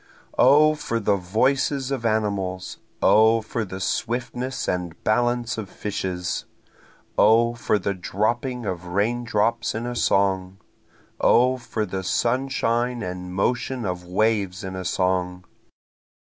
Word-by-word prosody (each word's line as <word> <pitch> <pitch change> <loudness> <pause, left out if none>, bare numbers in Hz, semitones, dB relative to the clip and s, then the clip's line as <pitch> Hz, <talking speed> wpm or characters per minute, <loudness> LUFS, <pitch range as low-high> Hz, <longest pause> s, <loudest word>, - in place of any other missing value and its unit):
O 150 +4 +6
for 115 -6 -3
the 105 -2 +2
voices 130 +8 0
of 125 -4 -1
animals 100 -4 -2 0.2
O 110 +1 +5
for 110 +1 -3
the 95 -2 -7
swiftness 120 +7 -2
and 90 -2 -2
balance 120 +1 +1
of 100 -3 -6
fishes! 95 -3 -3 0.7
O 115 +2 +5
for 115 -2 0
the 100 0 -2
dropping 115 +6 -2
of 90 -2 -4
raindrops 115 +3 0
in 115 +2 -3
a 120 0 -4
song! 95 -3 +1 0.6
O 125 +2 +4
for 110 -3 -3
the 95 -1 -4
sunshine 120 +1 0
and 90 0 -5
motion 125 +4 -1
of 90 -1 -3
waves 100 +1 0
in 95 0 -5
a 95 0 -5
song! 90 0 -1
110 Hz, 125 wpm, -24 LUFS, 95-120 Hz, 0.7 s, O